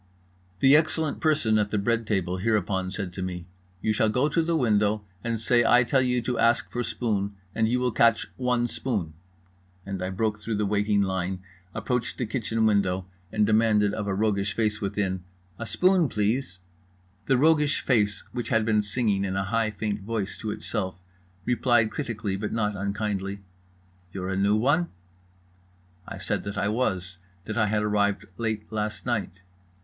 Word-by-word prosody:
The 135 +2 +7
excellent 155 -1 +1
person 145 -9 +2
at 105 -1 +1
the 105 - -1
bread 115 +2 0
table 95 -3 0
hereupon 95 -2 0
said 95 -2 -4
to 95 - -5
me: 90 -2 -4 0.4
"You 110 - +2
shall 110 +1 +2
go 125 +7 +2
to 165 +2 +2
the 165 +1 0
window 105 -4 +2 0.2
and 115 -1 -1
say 120 +2 +3
I 120 +2 +5
tell 130 +2 +2
you 125 -2 +1
to 125 0 -2
ask 115 +1 +3
for 120 - -2
spoon 105 -5 -2 0.2
and 110 -1 +1
you 125 +1 +1
will 125 0 +1
catch 115 0 +3
one 125 -1 +1
spoon"—and 90 -2 -6
I 90 - -2
broke 105 +2 -1
through 110 +1 -3
the 105 0 0
waiting 105 0 +2
line, 95 -1 -2 0.3
approached 125 -2 -2
the 125 - -1
kitchen 115 -1 -1
window, 95 -3 +2 0.3
and 105 -1 +2
demanded 105 -1 +3
of 105 -2 -3
a 95 - 0
roguish 100 -1 0
face 110 -1 0
within: 95 -2 -1 0.4
"A 110 - -4
spoon, 180 - +3
please." 105 -1 -1 0.7
The 135 - +4
roguish 150 0 +3
face, 105 -5 +1
which 120 -2 -4
had 115 -2 +2
been 105 -2 +3
singing 105 -1 0
in 95 -1 -2
a 95 - 0
high 110 +3 0
faint 105 0 -3
voice 105 -1 -3
to 110 - -4
itself, 95 -4 -3 0.5
replied 120 -2 +3
critically 110 -8 -3
but 105 +2 -3
not 105 -2 0
unkindly: 100 0 -2 0.7
"You're 95 0 -4
a 95 - -1
new 100 +2 +3
one?" 145 +10 +2 1.2
I - - -6
said - - -2
that 100 0 -5
I 100 +1 +1
was, 95 -6 -1 0.3
that 110 - -4
I 110 -2 +2
had 105 0 +1
arrived 105 -1 +1
late 110 -2 -2
last 105 0 -3
night. 105 -6 -2
105 Hz, 175 wpm, -26 LUFS, 100-115 Hz, 1.2 s, The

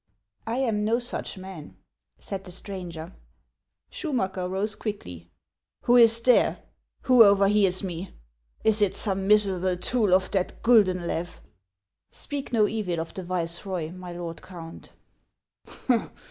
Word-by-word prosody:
"I 225 - -1
am 230 -5 0
no 225 +2 +2
such 240 -4 -4
man," 185 -5 -10 0.4
said 195 -1 -6
the 180 - -9
stranger. 180 -3 -7 0.8
Schumacker 190 - -2
rose 200 +3 -1
quickly. 90 - -7 0.3
" - - -65
Who 245 - +4
is 230 -1 +7
here? 250 - +4 0.4
"Who 250 -3 +7
over 200 -1 +5
hears 195 -3 +2
me? 180 0 -5 0.5
Is 220 -1 +4
it 205 -3 +2
some 195 -1 -1
miserable 190 -3 +2
tool 210 0 +2
of 185 0 0
that 190 -2 -2
GuLienlew 185 -7 +2 0.2
?" 95 0 -57
" - - -63
Speak 285 -3 -6
no 220 -3 +3
evil 200 -7 -2
of 165 - -5
the 190 - -5
viceroy, 175 -1 -3
my 180 0 -9
lord 170 -1 -7
Count." 170 -3 -11
190 Hz, 140 wpm, -26 LUFS, 175-215 Hz, 0.8 s, is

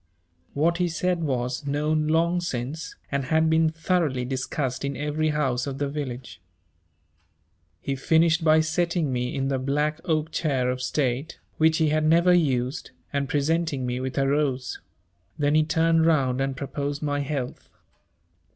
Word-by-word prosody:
What 170 +4 +2
he 175 -1 +1
said 175 +1 -1
was 130 0 -2
known 150 +2 0
long 170 +3 +2
since, 145 0 -4 0.2
and 140 -1 -1
had 160 +3 +2
been 160 0 +4
thoroughly 160 -5 0
discussed 130 0 -3
in 140 -1 -3
every 150 +2 -1
house 135 -4 0
of 135 -1 -4
the 145 0 -1
village. 135 -5 -6 1.4
He 135 +10 -3
finished 160 +4 +3
by 155 0 +5
setting 160 -2 0
me 125 +1 -2
in 135 0 -1
the 135 -1 0
black 150 +4 -1
oak 160 -2 0
chair 130 -6 0
of 125 0 -4
state 135 +3 -1 0.2
which 160 0 +4
he 160 -2 +2
had 155 +1 +1
never 170 +3 +5
used 135 -5 0 0.2
and 140 -1 -1
presenting 145 -2 0
me 125 0 -2
with 130 +1 -4
a 135 0 +2
rose; 135 -3 0 0.6
then 145 0 +1
he 155 0 +5
turned 165 +1 +2
round 135 -5 +2
and 135 -1 -2
proposed 140 +1 -4
my 145 -1 0
health. 140 -3 -4
145 Hz, 160 wpm, -25 LUFS, 135-160 Hz, 1.4 s, by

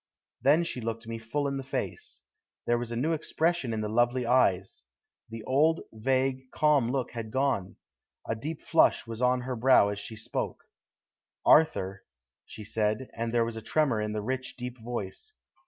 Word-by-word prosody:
Then 150 +5 +5
she 130 -7 -4
looked 115 0 -4
me 115 0 -5
full 140 +6 -2
in 140 0 -2
the 135 - -4
face. - - -4 0.4
There 120 0 +2
was 120 -1 -4
a - - -2
new 150 +8 +1
expression 160 -3 0
in 110 -1 -2
the 105 - -2
lovely 120 +3 +2
eyes; 100 -7 +2 0.5
the 115 -1 -7
old 155 +7 +3
vague, 130 +3 0
calm 145 -6 +3
look 130 -2 -1
had 115 -2 -5
gone. 130 -6 0 0.5
A - - 0
deep 150 +8 -6
flush 165 - +3
was 115 0 -6
on 125 0 +3
her 125 +1 -3
brow 120 -3 +5
as 100 0 -3
she 110 +2 -7
spoke: 110 - -4 0.8
"'Arthur,' 100 -11 +4 0.5
she 110 - -9
said, 110 +3 -1
and 115 0 -3
there 120 -1 +2
was 115 -1 -5
a - - -5
tremor 130 -2 +1
in 105 0 -2
the 105 -1 -3
rich, 130 +3 -3
deep 125 0 -6
voice. 120 - -5
120 Hz, 180 wpm, -29 LUFS, 110-135 Hz, 0.8 s, Then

